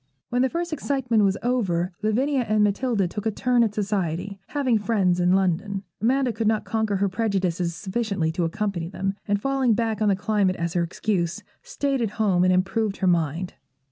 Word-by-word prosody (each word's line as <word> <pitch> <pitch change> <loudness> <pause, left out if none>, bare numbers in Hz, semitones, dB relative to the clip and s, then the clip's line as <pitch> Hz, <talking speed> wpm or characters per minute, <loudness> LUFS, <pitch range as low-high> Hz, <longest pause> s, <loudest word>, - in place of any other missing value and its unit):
When 245 +1 +1
the 260 - +3
first 340 +1 -3
excitement 265 -7 +1
was 195 -1 +2
over, 190 -8 0
Lavinia 255 +6 +1
and 215 -1 +3
Matilda 210 -1 +1
took 210 +5 -4
a - - +3
turn 245 +3 +1
at 215 -2 -1
society, 195 -2 -2
having 260 -6 +1
friends 200 -5 +1
in 180 0 +3
London. 195 +1 0 0.2
Amanda 255 +2 +2
could 225 -1 -1
not 215 -1 +1
conquer 220 -2 0
her 200 +1 +1
prejudices 185 -5 -1
sufficiently 195 -4 -1
to 175 +2 -1
accompany 170 0 -2
them, 195 +1 -2
and, 205 -1 +1
falling 265 -1 +1
back 225 -1 -1
on 210 - +3
the 195 - +3
climate 195 -1 +1
as 170 -1 -3
her 175 - +1
excuse, 175 0 -2 0.2
stayed 280 - -2
at 225 - 0
home 195 -5 +3
and 185 - +4
improved 195 +3 0
her - - -1
mind. 170 0 0
205 Hz, 190 wpm, -24 LUFS, 185-230 Hz, 0.2 s, and